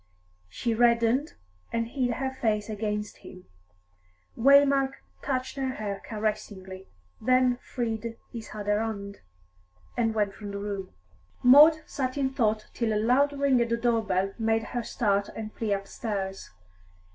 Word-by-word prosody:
She 230 - -2
reddened, 235 +4 +2 0.4
and 230 0 -1
hid 245 -2 -1
her 265 0 -2
face 215 -4 -1
against 210 0 -3
him. 185 -1 -13 0.9
Waymark 275 +1 +5 0.3
touched 260 0 -2
her 265 -1 -1
hair 200 -2 -4
caressingly, 195 -3 -4 0.4
then 255 0 +3
freed 230 -2 -4
his 230 -2 -8
other 205 0 0
hand, 200 -3 -4 0.8
and 225 -2 0
went 205 -2 +1
from 205 0 -8
the 200 - -5
room. 200 -2 -4 0.5
Maud 300 +5 +8
sat 255 -1 -3
in 265 -2 +1
thought 215 -4 0
till 230 -2 0
a - - 0
loud 260 +6 +3
ring 275 -3 +2
at 235 - 0
the 235 - +1
door 230 -1 +1
bell 195 -1 0
made 225 0 +1
her 240 +2 -3
start 200 -3 0
and 215 -1 -6
flee 220 -2 -3
upstairs. 195 -1 -3
225 Hz, 145 wpm, -27 LUFS, 210-255 Hz, 0.9 s, Maud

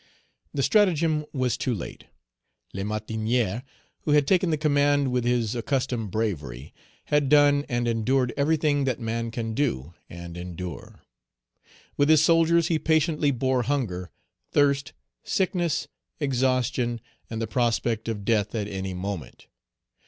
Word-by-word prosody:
The 140 - -1
stratagem 165 -7 +2
was 130 -4 0
too 125 - -1
late. 95 - -8 0.7
Lamartinière, 110 +2 -1 0.4
who 150 - 0
had 145 -1 +4
taken 185 +2 +3
the 155 - +1
command 145 -2 +2
with 125 -1 0
his 120 -3 +1
accustomed 125 -2 -1
bravery, 75 - -3 0.4
had 145 -2 +3
done 145 -1 +5
and 120 -1 0
endured 120 +2 +1
everything 145 -1 +2
that 130 -3 -1
man 115 0 -2
can 115 -1 -4
do 110 - -1 0.2
and 85 0 -8
endure. 90 0 -7 1.0
With 145 +1 +3
his 155 -1 +6
soldiers 165 0 +4
he 160 -2 +1
patiently 155 -2 +2
bore 130 -1 +1
hunger, 110 -9 -2 0.4
thirst, 140 -1 +2 0.3
sickness, 175 -4 0 0.3
exhaustion, 130 -3 0 0.3
and 110 - -4
the 115 - -1
prospect 115 -1 0
of 105 -3 -4
death 105 -1 +1
at 105 -2 -2
any 95 -2 -4
moment. 90 -6 -6
125 Hz, 130 wpm, -26 LUFS, 110-145 Hz, 1.0 s, his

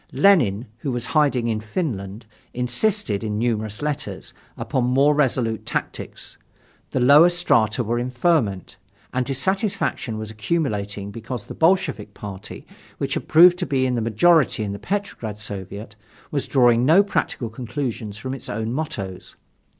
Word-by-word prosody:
Lenin, 125 - +4
who 135 - -3
was 120 -1 -2
in - - -7
hiding 140 -6 +2
in 110 -2 0
Finland, 110 - -4 0.3
insisted, 125 - 0
in 105 -1 -2
numerous 110 0 -2
letters, 135 -10 -4 0.2
upon 130 - -1
more 135 +4 +4
resolute 125 -6 0
tactics. - - -5 0.5
The - - -1
lower 145 +7 +7
strata 125 -10 +2
were 120 +2 -1
in 125 +1 -2
ferment, 120 - 0 0.4
and 130 0 +1
dissatisfaction 190 - -1
was 110 0 -6
accumulating 105 -5 -2
because 115 +1 -6
the - - -8
Bolshevik 160 - +1
party, 100 -2 -9 0.3
which - - -2
had - - -4
proved 175 +2 +7
to 180 - -2
be 130 -2 +1
in 130 - 0
the 120 - 0
majority 120 +3 +3
in 100 - -3
the 100 - -7
Petrograd 120 - -4
Soviet, 105 0 -7 0.4
was 140 -2 -2
drawing 120 -3 +4
no 165 +9 +6
practical 120 - -2
conclusions 115 -3 -4
from 130 +5 -5
its 135 - -7
own 110 +2 -3
mottos. 100 -11 -5
120 Hz, 150 wpm, -22 LUFS, 105-150 Hz, 0.5 s, lower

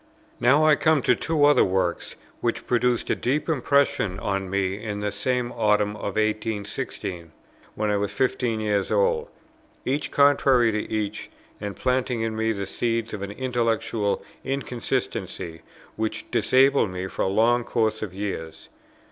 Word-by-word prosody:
Now 140 +6 +4
I 155 -1 +6
come 155 -4 +2
to - - +4
two 150 +3 +1
other 145 0 +6
works, 95 -2 -1 0.2
which 120 -1 -2
produced 125 0 +1
a - - +2
deep 140 +5 -1
impression 140 - +1
on 95 -1 -2
me 100 +1 -1
in 105 -2 -3
the 105 0 -2
same 125 +4 -1
Autumn 105 -2 +1
of 100 -2 -5
1816, 105 -5 -3 0.4
when 105 0 0
I 105 - +2
was 100 0 -1
fifteen 125 -3 0
years 105 -2 0
old, 480 -1 +2 0.6
each 140 +3 -1
contrary 135 -4 +4
to 105 0 -3
each, 105 -1 -3 0.3
and 100 -1 -5
planting 125 -2 0
in 115 -1 -2
me 110 0 +1
the 100 -2 -3
seeds 115 +1 -2
of 105 - -5
an 100 - -4
intellectual 115 -3 -1 0.2
inconsistency 120 -9 -3 0.4
which 110 0 -3
disabled 135 -3 +4
me 90 0 -4
for 95 - -5
a - - +2
long 115 +5 +3
course 110 -2 0
of 105 - -4
years. 90 -5 -6
110 Hz, 155 wpm, -25 LUFS, 100-125 Hz, 0.6 s, I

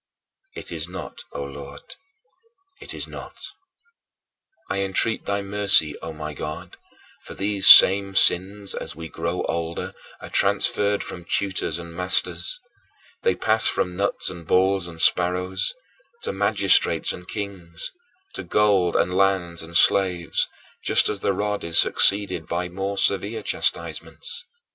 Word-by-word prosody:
It - - -8
is 80 0 -5
not, 90 - -8
O 70 - -4
Lord, 70 0 -10 0.9
it - - -7
is - - -5
not. - - -10 1.3
I 100 - -2
entreat 100 +3 -1
thy 100 0 -2
mercy, 100 -6 +3
O 80 - -7
my 75 -1 -7
God, 75 +1 -7 0.5
for - - -11
these 100 0 +1
same 100 0 +9
sins 100 +2 +2
as - - -5
we 80 +1 -8
grow 85 +2 -3
older 85 0 -4 0.3
are - - -11
transferred 105 0 +2
from 90 - -8
tutors 95 -4 -2
and 85 -1 -9
masters; 90 - -1 0.6
they 470 - +1
pass 110 0 +1
from 90 -1 -1
nuts 100 +2 -1
and 85 -3 -11
balls 95 0 +2
and 85 -1 -11
sparrows, 90 - +1 0.5
to - - -3
magistrates - - +2
and 90 0 -11
kings, 95 -6 -6 0.4
to - - -6
gold 100 -5 +2
and 90 - +1
lands 95 -3 +1
and 85 +1 -1
slaves, 90 -4 +2 0.3
just - - +3
as 105 - -2
the 100 - 0
rod 105 +1 -2
is 85 0 0
succeeded 100 -5 +4
by 90 +1 -3
more 95 +2 -4
severe 100 +4 0
chastisements. - - -3
95 Hz, 140 wpm, -23 LUFS, 85-100 Hz, 1.3 s, same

